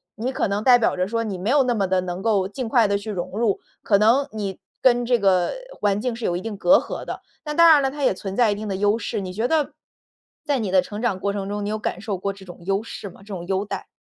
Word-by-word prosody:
你 245 +3 -2
可 265 - 0
能 200 +1 -1
代 245 -1 +7
表 230 - +2
着 180 - +1
说 230 +2 -1
你 200 -4 -3
没 185 +5 -3
有 280 +1 +5
那 250 -1 +1
么 200 -3 +1
地 185 0 +2
能 180 0 -5
够 200 -3 +2
尽 230 +4 -5
快 230 -3 +4
地 200 0 +1
去 205 +2 -6
融 180 -4 -4
入， 225 -3 +1 0.2
可 200 - +4
能 230 +7 +4
你 200 -3 -4 0.2
跟 245 -1 +4
这 240 0 +2
个 185 -3 +3 0.3
环 205 -1 +2
境 240 +1 -2
是 235 - -8
有 175 - 0
一 - - -5
定 220 +1 -5
隔 275 +8 +6
阂 - - -4
的。 - - -6 0.2
那 300 - -3
当 335 +2 +6
然 305 -3 +7
了， 270 -1 0
它 290 0 -5
也 260 - +4
存 190 +1 -6
在 235 -2 +4
一 - - 0
定 215 +1 -6
的 195 - -2
优 205 +2 +2
势。 230 -1 -3
你 185 -1 -6
觉 220 +5 0
得 300 -2 +1 0.7
在 285 -3 +1
你 210 -5 -2
的 185 -1 +5
成 205 +3 -7
长 220 -6 0
过 200 +1 -1
程 200 -1 -4
中， 205 0 -3
你 - - -2
有 215 - -1
感 - - -3
受 205 -2 -3
过 200 +2 -2
这 195 -1 -14
种 175 0 -11
优 195 +2 +1
势 210 -2 -7
吗？ 185 - -16
这 195 - -18
种 175 -2 -5
优 195 +1 0
待？ - - -5
210 Hz, 315 characters per minute, -23 LUFS, 195-240 Hz, 0.7 s, 代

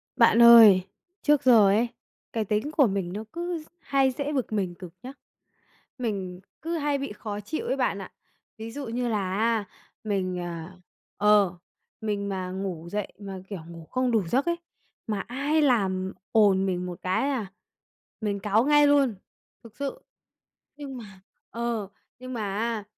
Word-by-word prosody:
Bạn 235 - +5
ơi, 225 -5 +9 0.4
trước 295 -1 +3
giờ 230 -6 +7
ấy, 215 +5 +3 0.5
cái 225 -2 -1
tính 215 +8 -1
của 295 -5 +4
mình 195 -3 -2
nó 215 +2 -4
cứ 345 +1 -3
d - - -22
hay 270 -4 +2
dễ 285 +3 -3
bực 255 -6 -2
mình 190 -4 -1
cực 175 -2 -10
nhá. 260 +2 -7 0.8
Mình 195 -7 -3 0.2
cứ 335 +1 -2
hay 290 -2 0
bị 275 0 -4
khó 210 -1 -6
chịu 255 +10 -4
ấy 265 - 0
bạn 250 -6 0
ạ. 190 - -9 0.5
Ví 225 +1 -7
dụ 285 +3 -6
như 240 +2 -2
là 195 -4 -1
á, 225 -1 +1 0.4
mình, 190 -4 -1
ờ, 170 -2 -5 0.8
ờ, 180 0 -11 0.4
mình 205 -2 -2
mà 185 -2 -3
ngủ 185 -3 -5
dậy 210 +1 -2
mà, 195 -2 -7
kiểu, 200 -3 -5
ngủ 165 -1 -10
không 255 +6 0
đủ 215 -6 +1
giấc 260 +10 +1
ấy, 340 0 +1 0.5
mà 210 -2 -1
ai 280 +9 0
làm 190 -9 +1 0.2
ồn 200 -3 +4
mình 180 -1 -1
một 180 -1 -6
cái, 185 +9 0
a, 255 -7 -1 0.8
mình 205 -2 -1
cáu 210 +3 +2
ngay 295 0 +5
luôn, 280 -6 +3 0.5
thực 230 -2 -15
sự. 280 -1 -4 0.8
Nhưng 275 -3 -7
mà, 205 -5 -12 0.3
ờ, 235 -3 -2 0.3
nhưng 255 0 -7
mà 230 - -3 0.2
á, 225 -1 -1
220 Hz, 170 wpm, -26 LUFS, 195-260 Hz, 0.8 s, ơi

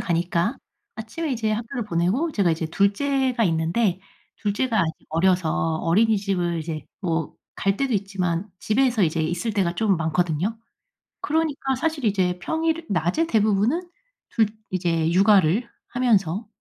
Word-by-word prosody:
가니까 175 +6 0 0.4
아침에 230 +9 -5
이제 225 -3 -1
학교를 230 +2 -3
보내고 205 - 0
제가 195 -8 +2
이제 160 0 -1
둘째가 245 - +1
있는데 175 +3 +1 0.4
둘째가 220 +2 0
아직 160 -3 0 0.2
어려서 165 -1 +1
어린이집을 195 -3 +1
이제 155 -1 -5 0.2
뭐 165 -5 -2 0.2
갈 195 0 +1
때도 275 +1 0
있지만 195 -2 -1
집에서 240 0 +2
이제 160 -1 +1
있을 175 +7 -1
때가 190 -4 0
좀 195 -1 +1
많거든요. 165 +5 0 0.6
그러니까 295 -4 0
사실 300 +1 -2
이제 185 -4 +1
평일 325 +3 -1
낮에 180 - +1
대부분은 225 - +1 0.4
둘 225 -2 +2 0.2
이제 170 -3 0
육아를 195 +3 +4 0.2
하면서 215 -5 +1
200 Hz, 305 characters per minute, -24 LUFS, 170-235 Hz, 0.6 s, 육아를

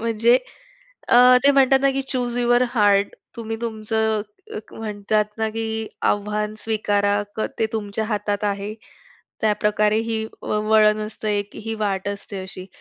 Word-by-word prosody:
म्हणजे 230 +2 +3 0.7
अ, 250 +1 +7
ते 280 - +7
म्हणतात 270 -1 +4
ना 275 - +4
की 270 0 -2
"चूज 245 -2 -1
युवर 240 0 +3
हार्ट." 205 -3 +3 0.2
तुम्ही 225 -1 -4
तुमचं 220 -1 -1 0.3
एक 215 - -9
म्हणतात 210 -1 -1
ना 220 0 0
की 220 -1 -3 0.2
आव्हान 210 +1 0
स्वीकारा, 205 -2 +1
क - - -3 0.2
ते 220 - +2
तुमच्या 215 0 -2
हातात 210 -1 -2
आहे. 205 +1 -2 0.7
त्याप्रकारे 210 0 +2
ही 220 -1 -1 0.2
व 210 - -1
वळण 215 -1 +5
असतं 215 0 -5
एक, 205 -1 -1
ही 225 +1 -5
वाट 195 -1 -1
असते 200 0 -5
अशी. 185 0 -9
215 Hz, 150 wpm, -22 LUFS, 205-225 Hz, 0.7 s, अ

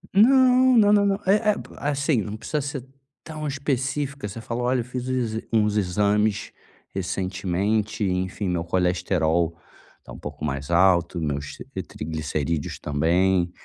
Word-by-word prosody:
Não 255 +3 +6
não 205 -2 +6
não 205 -1 +4
não 195 - +2
é 195 +2 +5 0.2
é, - - -6 0.3
assim, 140 -3 +1
não 105 +1 -5
precisa 150 +7 -2
ser 140 -2 -5 0.4
tão 155 -1 -6
específica 140 -1 -2
você 100 - -7
fala: 115 +2 -4
"Olha 125 +1 +1
eu - - -7
fiz 125 0 -5
uns 125 -4 -1
exa 110 - -3
uns 105 -2 +2
exames 105 +2 +1 0.4
recentemente, 95 +3 -1
enfim, 95 +1 -1
meu 90 -2 -1
colesterol 85 -2 +1 0.5
tá - - -13
um - - -10
pouco 75 - -6
mais 70 0 -3
alto, 85 0 +3
meus 75 -2 -3
t - - -7
triglicerídeos 80 0 -3
também, 85 +5 +1
105 Hz, 150 wpm, -24 LUFS, 85-135 Hz, 0.5 s, Não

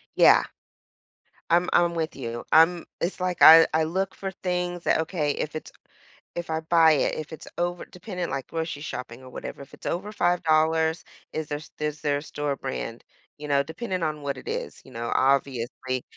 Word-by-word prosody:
Yeah, - - +7 1.1
I'm 175 +1 +4
I'm 175 0 +3
with 160 -1 -2
you, 120 -3 -5
I'm 165 +2 +5
it's 180 +2 -2
like, 180 -1 -1
I 160 +1 +11
I 160 0 +3
look 190 +4 -2
for 195 - -5
things 180 -2 -3
that - - +3
Okay, 155 -3 -1
if 155 - -4
it's 155 - -6 0.6
if 175 0 -5
I 160 0 0
buy 160 0 +5
it 145 - +1
if 155 +1 -6
it's 160 - -9
over 175 0 -1
depending, 180 -1 -6
like, 135 -2 -3
grocery 160 -3 -4
shopping 125 -4 -6
or 130 - -12
whatever, 135 - -7
if 140 - -14
it's - - -12
over 195 +5 -3
$5, 160 -3 +2 0.3
is 155 -1 -4
there 145 - -2
s 150 - -13
is 150 0 -3
there 145 -2 +1
store 145 -1 -3
brand, 120 -3 -5 0.3
you 150 0 -7
know, 140 -1 +3
depending 185 +5 -4
on 155 -2 -2
what 140 -1 -2
it - - -11
is, - - -4
you - - -15
know, 115 +1 -4
obviously. 130 -1 0
160 Hz, 190 wpm, -26 LUFS, 140-175 Hz, 1.1 s, I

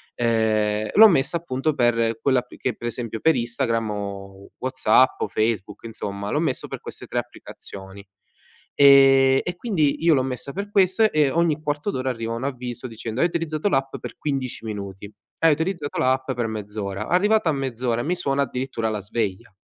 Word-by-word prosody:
ehm, 110 -2 +1
l'ho 220 +2 +9
messa, 160 -4 +2
appunto, 155 -2 -2
per 115 -3 +1
quella 130 -2 +3
app 125 0 -11
che, 125 -3 -2
per 120 - -9
esempio, 115 -2 -5
per 160 -1 +4
Instagram 115 -2 -1
o 100 -1 -7
WhatsApp 130 0 +3
o - - 0
Facebook, 110 -2 -2
insomma, 100 -3 -5
l'ho 150 - 0
messo 155 -5 -2
per - - -6
queste - - -10
3 - - -4
applicazioni. 95 0 -8 0.7
Ehm, 135 -1 +7
e 175 - -4
quindi 170 -8 0
io 170 - +6
l'ho 130 - +2
messa 130 +1 -5
per 200 +2 -5
questo 195 +2 +3
e 150 -3 +3
ogni 165 -1 +1
quarto 150 +5 -2
d'ora 130 -3 -2
arriva 115 -1 -4
un 115 +2 -5
avviso 125 -2 -5
dicendo: 115 +1 -5
"Hai 170 - +5
utilizzato 165 0 -2
l'app 135 -6 0
per - - -8
15 135 -5 -3
minuti, 100 -2 -7 0.3
hai 165 - +5
utilizzato 160 -1 -3
l'app 130 +1 +1
per 120 -1 -2
mezz'ora", 105 -2 -5
arrivata 205 +1 +3
a - - +2
mezz'ora 125 -3 -2
mi 170 - 0
suona 140 -5 0
addirittura 125 -3 -3
la 105 -1 -2
sveglia. 105 +1 -4
130 Hz, 175 wpm, -23 LUFS, 110-150 Hz, 0.7 s, l'ho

